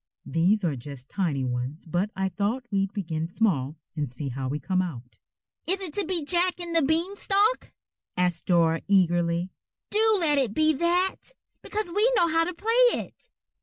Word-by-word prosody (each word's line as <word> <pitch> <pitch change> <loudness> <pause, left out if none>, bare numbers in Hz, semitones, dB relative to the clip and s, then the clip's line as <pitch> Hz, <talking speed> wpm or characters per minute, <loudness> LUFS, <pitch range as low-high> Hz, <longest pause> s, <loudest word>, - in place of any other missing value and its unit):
"These 185 +6 +2
are 160 -5 0
just 130 +1 -10
tiny 160 -9 -1
ones 125 +4 -4
but 175 +5 -1
I 190 0 -1
thought 210 +7 -2
we'd 195 -1 0
begin 165 -6 -3
small 165 - 0 0.2
and 150 -4 -2
see 130 +3 -6
how 130 +1 -4
we 145 - -2
come 185 +3 0
out." 125 -9 -7 0.5
"Is 380 +3 +1
it 370 -6 -3
to 405 - 0
be 340 -5 -1
Jack 360 +3 +2
and 340 -1 -4
the 330 - +5
Beanstalk?" 390 - +1 0.5
asked 180 -2 0
Dora 165 -2 +3
eagerly. 175 -2 +2 0.4
"Do 435 0 +4
let 300 -4 +3
it 240 -6 -1
be 310 0 +4
that, 355 - 0 0.3
because 425 -4 -4
we 440 +4 +4
know 345 -6 +4
how 330 +1 +2
to 360 - -4
play 470 +6 +3
it." - - -11
200 Hz, 175 wpm, -26 LUFS, -, 0.5 s, the